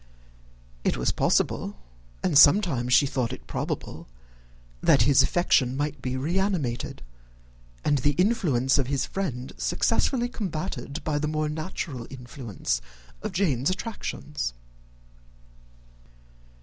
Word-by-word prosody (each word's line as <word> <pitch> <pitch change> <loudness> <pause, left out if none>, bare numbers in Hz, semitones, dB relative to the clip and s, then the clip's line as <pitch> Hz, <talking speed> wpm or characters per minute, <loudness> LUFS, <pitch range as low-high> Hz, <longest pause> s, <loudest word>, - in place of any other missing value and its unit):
It - - +1
was 60 - +1
possible, 100 - +1 0.5
and - - +1
sometimes 145 - +6
she 130 - +6
thought 130 -3 -1
it - - -8
probable, - - -4 0.7
that - - +5
his 140 +2 +5
affection 135 -7 +2
might 145 -1 -2
be 130 0 -2
re 165 +8 0
animated, 165 -12 -2 0.8
and 145 -1 +3
the 145 +4 +2
influence 155 - +2
of 130 - 0
his 135 -1 0
friends 135 -10 -4
successfully 240 +1 +1
combated 170 -8 -4
by 150 -2 0
the 150 - -1
more 155 0 -1
natural 155 -5 -5
influence 120 - -4 0.4
of - - -3
Jane's 160 -8 +1
attractions. 150 - -4
145 Hz, 115 wpm, -26 LUFS, 125-175 Hz, 0.8 s, sometimes